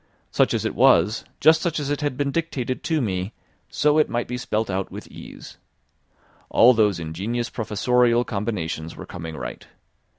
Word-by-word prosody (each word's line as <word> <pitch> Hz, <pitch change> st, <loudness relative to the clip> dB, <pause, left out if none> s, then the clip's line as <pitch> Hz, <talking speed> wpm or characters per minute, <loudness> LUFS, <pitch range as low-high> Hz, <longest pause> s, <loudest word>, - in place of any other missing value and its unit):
Such -, -, +2 dB
as -, -, -2 dB
it -, -, -1 dB
was, 95 Hz, +7 st, +4 dB
just 160 Hz, +2 st, +5 dB
such 165 Hz, -2 st, -1 dB
as 145 Hz, -1 st, -3 dB
it 145 Hz, -, -1 dB
had 145 Hz, -3 st, -2 dB
been 140 Hz, 0 st, 0 dB
dictated 135 Hz, -6 st, -2 dB
to 160 Hz, -3 st, +1 dB
me, 95 Hz, -2 st, -2 dB, 0.4 s
so 150 Hz, +1 st, +2 dB
it 155 Hz, -, +3 dB
might 120 Hz, 0 st, -2 dB
be 125 Hz, -, -4 dB
spelt 110 Hz, -3 st, -2 dB
out 95 Hz, 0 st, -2 dB
with -, -, -8 dB
ease. -, -, -12 dB, 0.9 s
All 125 Hz, +2 st, +6 dB
those 105 Hz, -5 st, +2 dB
ingenious 100 Hz, +10 st, -3 dB
professorial 120 Hz, +2 st, +2 dB
combinations 90 Hz, -7 st, -3 dB
were -, -, -9 dB
coming 80 Hz, -2 st, -7 dB
right. -, -, -7 dB
120 Hz, 170 wpm, -23 LUFS, 95-140 Hz, 0.9 s, All